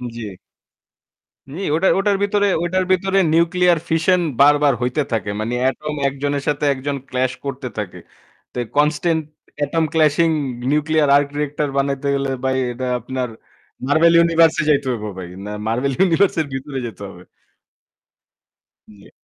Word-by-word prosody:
জি। 115 -3 -6 1.2
নি 175 - -6
ওটার, 190 +4 +3
ওটার 200 0 +2
ভিতরে, 205 0 +2 0.2
ওটার 185 +2 0
ভিতরে 195 +1 +2
nuclear 170 +1 +3
fission 165 +3 +2 0.2
বারবার 145 0 +5
হইতে 125 +5 0
থাকে। 110 -3 -1
মানে 115 +3 -3 0.2
atom 150 +2 -5
একজনের 140 +1 -2
সাথে 150 0 0
একজন 140 +1 -4
clash 130 0 0
করতে 135 -2 -4
থাকে। 105 -4 -5 0.6
তো - - -9 0.2
constant 155 +2 +2 0.4
atom 160 +3 0
clashing 160 +1 +3 0.4
nuclear 150 0 +2
arc 145 0 +3
reactor 150 0 -1
বানাইতে 140 0 -1
গেলে 140 0 -1
ভাই 130 0 +1 0.2
এটা 130 +2 -5
আপনার 125 +1 -4 0.6
Marvel 165 +4 +4
universe-এ 165 -1 +3
যাইতে 145 -2 +2
হইবো 105 -3 -4
ভাই। 90 -2 -6 0.2
না 105 - -6 0.2
Marvel 125 +5 0
universe-এর 170 -2 +2
ভিতরে 135 +1 -5
যেতে 105 -3 -11
হবে। 90 -2 -13 1.6
জি। 100 -2 -17
145 Hz, 135 wpm, -20 LUFS, 130-165 Hz, 1.6 s, বারবার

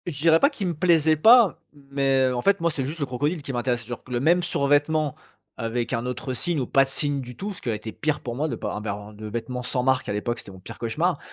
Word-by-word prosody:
Je 150 -6 -4
dirais 165 +1 +5
pas 280 - +5
qu'il 250 -10 -5
me 175 - -1
plaisait 160 -1 +3
pas, 220 +1 +6
mais 135 -2 +1
en 125 -1 -1
fait 200 +5 +3
moi 170 0 +1
c'est 140 -3 -3
juste 150 +5 -5
le 145 - 0
crocodile 145 +5 -2
qui 135 - -5
m'intéressait, 120 -1 -1
genre 120 +1 -7
q 130 - -14
le 120 - +1
même 170 +7 +3
survêtement 145 -1 +1 0.4
avec 115 +1 -2
un 115 +2 -1
autre 130 +1 -4
signe 155 +6 -1
ou 130 - -1
pas 135 +3 +4
de - - -6
signe 145 0 0
du 125 -1 -9
tout. 205 +1 -4
Ce - - -13
qui 125 - -3
aurait 110 - 0
été 110 +1 -7
pire 150 +7 -1
pour 120 - -5
moi 150 +5 -1
de 130 - -3
pas - - -4
avoir, 105 0 -5
heu, - - -15
de 105 +1 -8
vêtements 120 +3 -4
sans 125 0 -2
marque 130 0 +1
à - - -1
l'époque, 120 +3 -2
c'était - - -9
mon 95 - -12
pire 90 - -11
cauchemar. 155 +8 0
135 Hz, 280 wpm, -24 LUFS, 120-160 Hz, 0.4 s, pas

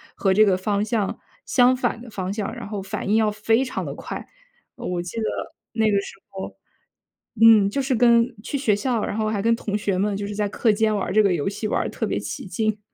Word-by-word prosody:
和 195 -2 +2
这 215 +3 +6
个 190 -3 +3
方 200 +2 0
向， 215 -2 -1 0.3
相 250 0 +4
反 245 -2 -1
的 245 - -10
方 190 -2 -4
向， 215 +1 -3
然 240 - -7
后 205 -1 -4
反 195 +1 -4
应 210 - +3
要 220 -1 +3
非 225 +4 +2
常 255 - -4
地 - - -5
快。 - - -7 0.5
我 180 -1 -3
记 175 +5 -8
得 - - -1 0.5
那 225 -1 +1
个 200 - +3
时 - - -9
候 190 -1 -7 0.9
嗯， 225 -3 +8
就 275 +7 -1
是 265 -1 0
跟 235 +1 +4
去 285 - -3
学 235 -7 +2
校， 225 +1 -1
然 - - -3
后 215 -1 0
还 210 -2 -1
跟 230 +2 +3
同 210 -2 -3
学 200 -2 -1
们 200 +2 0
就 200 0 -4
是 205 - -5
在 205 0 0
课 220 +2 +2
间 215 0 +1
玩 200 - -1
儿 - - -3
这 215 - +6
个 195 -3 +3
游 150 -5 -1
戏 210 +2 -4
玩 - - 0
儿 - - -3
得 - - -2
特 - - -2
别 - - -1
起 - - -6
劲。 215 +3 -1
215 Hz, 270 characters per minute, -23 LUFS, 200-230 Hz, 0.9 s, 嗯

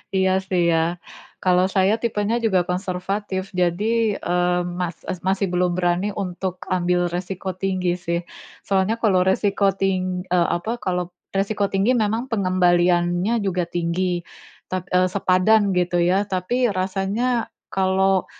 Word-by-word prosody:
Iya 190 0 +3 0.2
sih 180 -2 +2
ya, 165 +2 +1 0.5
kalau 180 0 +4
saya 190 +1 +3
tipenya 230 0 0
juga 190 -6 +2
konservatif 190 +1 -3
jadi, 205 +5 +1
eee, 180 0 +1 0.2
mas 180 -1 -3
es 185 - -3
masih 190 +1 +1
belum 180 0 +1
berani 180 +3 +1
untuk 185 -1 -3 0.2
ambil 180 0 +1
resiko 185 +1 -4
tinggi 185 -1 -1
sih, 170 0 0 0.5
soalnya 195 +3 +1
kalau 205 -5 +3
resiko 195 +2 +2
ting 185 -1 -1
eee, 175 -1 +3
apa 225 +6 -4
kalau 180 -2 -2 0.2
resiko 200 0 0
tinggi 200 +6 +2
memang 225 +1 0
pengembaliannya 180 +1 +2
juga 185 -2 0
tinggi, 175 +1 -1 0.4
tap 185 0 -4
eee, 180 0 +3
sepadan 195 +3 +3
gitu 175 -1 +1
ya 185 +4 +2
tapi 205 +7 0
rasanya 195 +6 -1 0.2
kalau, 190 0 +2
185 Hz, 135 wpm, -22 LUFS, 180-200 Hz, 0.5 s, kalau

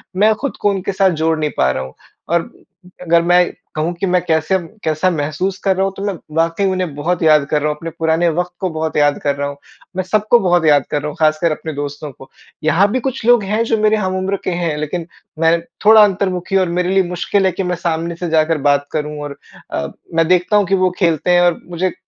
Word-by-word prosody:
मैं 210 +3 +4
खुद 280 +5 -5
को 205 - +3
उनके 195 -1 -2
साथ 190 0 +3
जोड़ 160 0 +2
नहीं 155 -1 0
पा 65 - +3
रहा 65 - -3
हूँ। 65 0 -10 0.4
और 170 0 +2 0.6
अगर 170 -1 +3
मैं 175 +1 +4 0.3
कहूँ 160 +3 -1
कि 195 - 0
मैं 180 -1 +2
कैसे 160 +2 +1 0.3
कैसा 155 +3 +1
महसूस 160 +5 -2
कर 195 -1 +2
रहा 190 - +1
हूँ, 195 - -3
तो 195 - -5
मैं 200 - -1 0.2
वाक़ई 165 +4 +1
उन्हें 185 -5 -2
बहुत 165 +4 -1
याद 155 -2 +5
कर 150 - +1
रहा 150 - 0
हूँ, 150 - -2
अपने 165 +2 -6
पुराने 165 +1 +2
वक़्त 180 +2 -2
को 185 - -1
बहुत 160 -1 -3
याद 145 -1 +3
कर 140 -1 +1
रहा 140 0 -2
हूँ, 140 0 -7 0.4
मैं 185 - -1
सबको 215 +5 +2
बहुत 175 -4 +2
याद 145 -4 +4
कर 145 - 0
रहा 150 - -4
हूँ, 150 - -8
ख़ासकर 155 +1 +2
अपने 155 +1 -5
दोस्तों 145 +1 -5
को। 135 +1 -15 0.3
यहाँ 170 +6 +3
भी 255 - 0
कुछ 265 -2 -4
लोग 240 -3 +5
हैं, 215 +4 0
जो 225 -1 0
मेरे 215 0 +3
हम-उम्र 190 0 -1
के - - -1
हैं। 170 -3 -1
लेकिन 160 +3 -4 0.3
मैं 165 +1 +3 0.3
थोड़ा 215 0 +8
अंतर्मुखी 190 -2 -1
और 185 -2 +1
मेरे 180 0 0
लिए 195 - +4
मुश्किल 190 +2 0
है 190 - +3
कि 195 - -3
मैं 180 -1 -1
सामने 170 0 -2
से 175 0 -4
जाकर 160 0 +2
बात 145 0 +1
करूँ 150 -1 -3
और 145 -1 -7 0.3
अ, 70 - -2 0.3
मैं 165 -1 +3
देखता 180 +4 +3
हूँ 205 - +3
कि 195 - +2
वो 185 - +4
खेलते 170 -1 +1
हैं 175 - +5
और 175 -1 +2
मुझे 180 +1 -2
170 Hz, 240 wpm, -17 LUFS, 155-190 Hz, 0.6 s, थोड़ा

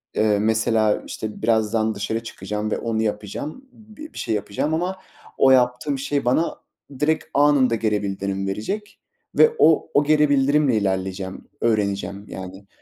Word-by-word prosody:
eee, 105 -1 +2
mesela, 110 0 +2
işte 110 -1 -6
birazdan 110 -1 +1
dışarı 110 +3 -3
çıkacağım 105 -1 -4
ve - - 0
onu 115 -1 -1
yapacağım, 110 - -4
b 215 +3 -16
bir - - -12
şey 110 - -1
yapacağım 105 +9 -2
ama 180 +3 -1 0.4
o 135 - +5
yaptığım 125 +2 +2
şey 140 0 -1
bana 145 +7 +1 0.4
direkt 155 +1 +1
anında 140 -4 +4
geri 105 -2 0
bildirim 95 0 -3
verecek 195 - -4 0.4
ve 460 0 +6
o 160 0 +4
o 145 - +4
geri 150 0 +3
bildirimle 140 -2 +3
ilerleyeceğim, 95 -1 -3
öğreneceğim 100 -3 -1
yani. 95 +1 -9
110 Hz, 145 wpm, -22 LUFS, 105-145 Hz, 0.4 s, ve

